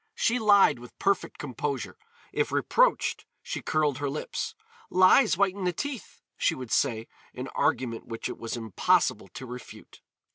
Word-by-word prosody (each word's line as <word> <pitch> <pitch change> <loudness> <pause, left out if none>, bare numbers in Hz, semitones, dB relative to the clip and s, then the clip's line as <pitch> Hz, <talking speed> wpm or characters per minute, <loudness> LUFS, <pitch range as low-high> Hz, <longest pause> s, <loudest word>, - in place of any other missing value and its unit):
She 250 - +1
lied 205 - +5
with 120 0 -13
perfect 195 -1 0
composure; 140 0 -4 0.4
if - - 0
reproached - - +2 0.2
she - - -4
curled 150 -3 0
her 145 -1 -1
lips. 150 +2 -4 0.3
"Lies 185 +3 +5
whiten 200 0 +1
the 180 - +2
teeth," 285 -1 -6
she - - +1
would 125 -3 -8
say, 115 -5 +1 0.3
an - - -5
argument 115 -3 -1
which 115 -1 -4
it - - -7
was 115 +1 -4
impossible 110 -4 +1
to 130 - -9
refute. 125 0 -11
145 Hz, 150 wpm, -27 LUFS, 125-200 Hz, 0.4 s, lied